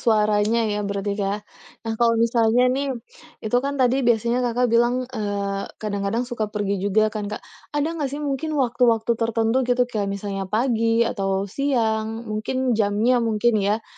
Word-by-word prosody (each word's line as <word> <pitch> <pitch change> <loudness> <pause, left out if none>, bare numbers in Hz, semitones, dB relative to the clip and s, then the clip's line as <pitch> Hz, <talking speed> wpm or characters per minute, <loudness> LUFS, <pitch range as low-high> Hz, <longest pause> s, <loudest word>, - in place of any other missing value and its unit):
suaranya 215 0 +2
ya - - -1
berarti, 200 0 -2
Kak. 195 +1 0 0.5
Nah, 225 - -2
kalau 230 -1 +4
misalnya 230 +1 +3
nih, 280 +1 -1 0.6
itu 220 - -4
kan 280 0 -1
tadi 255 0 +3
biasanya 235 +2 +2
Kakak 245 +1 +1
bilang, 240 +1 +4 0.2
eee, 200 -2 -2
kadang-kadang 205 +2 -1
suka 235 -3 -1
pergi 205 -1 -2
juga 205 +2 +3
kan, 210 -1 -3
Kak. 210 - -5 0.4
Ada 290 - +1
nggak 300 -4 -2
sih 290 - -4
mungkin 290 +4 -2
waktu-waktu 240 -3 +2
tertentu 225 +1 +1
gitu, 250 0 +3
kayak 215 -5 -3
misalnya 195 -1 -4
pagi, 230 +1 +2
atau 195 -3 -1
siang, 225 -5 0
mungkin 250 +4 -1
jamnya 220 +3 +2
mungkin 230 +1 +1
ya, 210 +3 0
225 Hz, 160 wpm, -23 LUFS, 205-240 Hz, 0.6 s, kalau